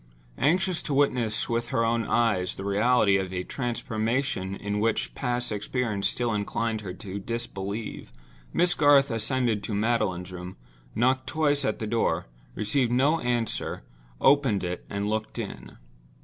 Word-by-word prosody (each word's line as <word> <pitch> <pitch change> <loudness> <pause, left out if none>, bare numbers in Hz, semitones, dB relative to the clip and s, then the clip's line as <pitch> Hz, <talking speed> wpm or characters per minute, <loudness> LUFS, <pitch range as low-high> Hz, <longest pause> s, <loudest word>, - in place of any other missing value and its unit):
Anxious 180 +5 +2
to 140 - -2
witness 125 -6 +2
with 115 0 -1
her 115 -1 +1
own 115 0 +1
eyes 110 -6 +1
the 95 - -6
reality 100 0 +4
of 95 -1 -3
a 90 -1 -2
transformation 115 -4 -2
in 105 +1 -3
which 105 - 0
past 120 - -2
experience 105 -1 -1
still 120 -2 0
inclined 110 +2 -1
her 95 -3 -5
to 100 +1 -6
disbelieve, 105 -1 -5 0.4
Miss 175 +1 +3
Garth 145 -3 +5
ascended 115 -1 0
to 105 - -3
Magdalen's 100 -5 0
room, 90 -3 -8 0.4
knocked 130 +3 +2
twice 145 -2 +1
at 135 - 0
the 110 - -4
door, 105 -6 0 0.3
received 120 +3 +1
no 140 +6 +3
answer, 120 -2 -2 0.4
opened 135 -8 +4
it 90 0 -4
and 100 +1 -2
looked 110 +1 -2
in. - - -6
115 Hz, 150 wpm, -27 LUFS, 100-125 Hz, 0.4 s, Garth